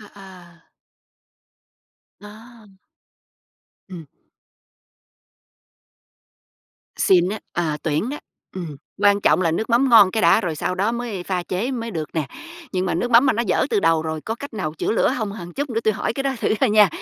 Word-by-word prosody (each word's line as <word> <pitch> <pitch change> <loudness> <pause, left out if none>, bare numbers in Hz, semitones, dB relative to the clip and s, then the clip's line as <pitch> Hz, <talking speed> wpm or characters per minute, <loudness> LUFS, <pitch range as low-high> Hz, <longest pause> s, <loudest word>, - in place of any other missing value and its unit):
À, 210 - -13
à. 180 -4 -15 1.5
À! 215 -1 -15 1.1
Ừm. 175 -5 -10 2.9
Xịn 180 -2 +3
á. 215 +3 -3
À, 160 -3 -1
tuyển 155 +8 -1
đó. 295 - -5 0.4
Ừm. 165 -6 -6 0.3
Quan 205 0 +4
trọng - - +3
là 165 - +2
nước 215 +9 -2
mắm 245 +4 +3
ngon 210 -5 +7
cái 220 +3 -1
đã - - +5
rồi 175 -7 -3
sau 180 - -2
đó 200 +5 0
mới 235 -6 -4
pha 180 0 -2
chế 190 +8 -3
mới 230 -3 -4
được 160 -6 -4
nè. 155 -3 -1 0.5
Nhưng 185 -1 -1
mà - - -1
nước 240 +9 -2
mắm 240 +3 +6
mà 260 - +4
nó 230 - -1
dở 185 - +1
từ - - +2
đầu 165 -3 +2
rồi 160 -1 -4
có 225 - -4
cách 285 +4 -9
nào 185 -8 -3
chữa - - -1
lửa 225 - +2
hông, 220 -4 -3
hờn 175 -4 -9
chút 285 +5 -4
nữa 225 -1 -1
tui 220 -1 +1
hỏi - - -2
cái 270 - -3
đó 275 0 0
thử - - +1
thôi 265 - +3
nha, 210 -1 +6
200 Hz, 185 wpm, -21 LUFS, 175-230 Hz, 2.9 s, ngon